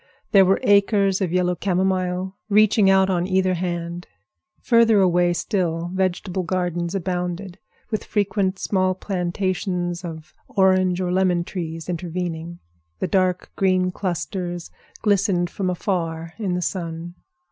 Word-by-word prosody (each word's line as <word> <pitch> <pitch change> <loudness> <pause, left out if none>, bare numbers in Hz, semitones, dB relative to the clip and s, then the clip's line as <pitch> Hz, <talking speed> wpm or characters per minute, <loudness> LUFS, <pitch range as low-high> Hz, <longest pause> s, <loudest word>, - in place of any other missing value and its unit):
There 195 -2 +7
were 190 +1 +3
acres 200 -1 +3
of 185 -3 0
yellow 180 0 +2
camomile 185 +1 -1
reaching 210 -1 +5
out 190 0 +5
on 175 -1 0
either 185 -1 +2
hand. 175 -1 -4 0.5
Further 230 -3 +4
away 175 -2 +3
still, 175 -3 -1
vegetable 185 0 -1
gardens 175 0 -2
abounded, 180 0 -3 0.3
with 215 - -1
frequent 200 -2 0
small 185 -2 0
plantations 180 -1 -2
of 160 -2 -8
orange 185 -2 +3
or 180 -1 -1
lemon 180 -2 +2
trees 165 -3 -5
intervening. 170 -1 -4 0.4
The - - -2
dark 185 -2 +1
green 185 -1 +2
clusters 175 -1 -4 0.3
glistened 195 -4 +2
from 190 -2 -2
afar 165 -3 -2
in 190 -5 -1
the 180 - -1
sun. 170 -1 -4
185 Hz, 125 wpm, -22 LUFS, 175-190 Hz, 0.5 s, There